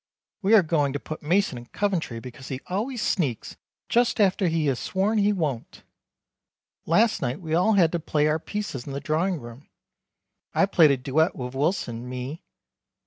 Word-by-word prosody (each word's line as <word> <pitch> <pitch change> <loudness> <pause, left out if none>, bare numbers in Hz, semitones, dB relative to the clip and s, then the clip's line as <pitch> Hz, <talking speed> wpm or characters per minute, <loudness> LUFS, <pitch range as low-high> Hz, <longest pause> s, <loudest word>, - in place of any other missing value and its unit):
We 205 +3 +5
are 205 - +7
going 150 -4 +1
to 145 - -2
put 155 - -7
Mason 170 -4 +1
in 120 - -13
Coventry 180 - -2
because 125 +2 -10
he 130 -2 -4
always 220 +6 -2
sneaks 140 - -1 0.3
just 240 0 +2
after 195 -2 +3
he 165 -2 0
has 135 -4 0
sworn 205 +3 0
he 205 0 +3
won't. 150 - -3 1.0
Last 215 +6 +3
night 130 +1 -2
we 160 -3 -5
all 180 +7 +3
had 175 -5 +4
to 170 - -1
play 150 -2 0
our 155 +1 +2
pieces 180 - -5
in 140 - -5
the 140 - -3
Drawing 165 +4 0
Room. 120 +3 -12 0.9
I - - +5
played 170 -5 +5
a 140 - +3
duet 150 +7 +1
with 125 0 -6
Wilson 130 -5 -2
mi. 130 +6 -6
160 Hz, 180 wpm, -25 LUFS, 135-195 Hz, 1.0 s, are